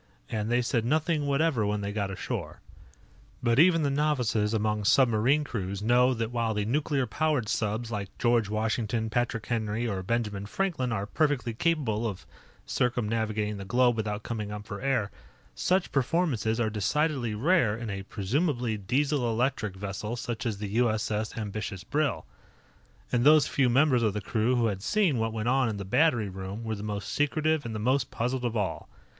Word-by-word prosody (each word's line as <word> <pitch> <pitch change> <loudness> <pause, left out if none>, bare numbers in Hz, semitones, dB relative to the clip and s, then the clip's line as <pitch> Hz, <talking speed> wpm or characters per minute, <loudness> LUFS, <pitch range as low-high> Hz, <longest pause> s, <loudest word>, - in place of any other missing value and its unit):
And 110 -1 -2
they 120 0 +3
said 115 -1 0
nothing 155 +3 +1
whatever 140 -4 +2
when 105 0 -1
they 100 0 -3
got 100 -2 -2
ashore. 95 - -5 0.8
But 120 +2 +3
even 165 -1 +5
the 140 - +1
novices 125 -8 +1
among 105 -1 0
submarine 125 +5 +4
crews 100 -7 -4
know 125 +3 +4
that 115 0 -2
while 115 -2 -1
the 105 -1 0
nuclear 140 +2 0
powered 145 -1 0
subs 110 +2 -1
like 100 -3 -5
George 120 -3 +2
Washington, 110 +1 -1
Patrick 115 -1 -1
Henry, 115 0 -1
or 100 -4 -2
Benjamin 105 -1 -2
Franklin 150 - -1
are 100 -3 -1
perfectly 140 -1 0
capable 120 -6 0
of 100 -4 -6 0.4
circumnavigating 110 -3 -1
the 100 - -6
globe 120 +4 +3
without 105 -1 -3
coming 105 -3 -4
up 105 0 -6
for 100 - -7
air, 125 -7 0 0.4
such 185 - 0
performances 130 - +1
are 110 -2 +1
decidedly 120 +2 0
rare 120 - +2
in 115 -2 -5
a 100 0 -4
presumably 120 - -1
Diesel 130 +5 0
electric 115 -4 -1
vessel 100 +3 -4
such 120 0 -4
as 110 -3 -2
the 105 0 -5
U.S.S. 110 -1 0
Ambitious 105 -3 -4
Brill. 145 +5 -1 0.9
And 120 -1 +2
those 150 +1 +7
few 130 -3 +2
members 130 0 +4
of 110 -3 +1
the - - 0
crew 115 +5 +1
who 120 -1 +2
had 100 -4 -1
seen 175 - +2
what 115 0 0
went 110 +1 -3
on 130 -1 +3
in 105 - -3
the 100 - -5
battery 120 - +2
room 95 +3 -6
were 110 -1 -2
the 100 - -5
most 105 -1 -4
secretive 155 -1 +1
and 110 - -5
the - - -3
most 125 +3 +1
puzzled 125 +2 -2
of 120 -1 -1
all. 100 -3 -3
115 Hz, 180 wpm, -28 LUFS, 105-130 Hz, 0.9 s, those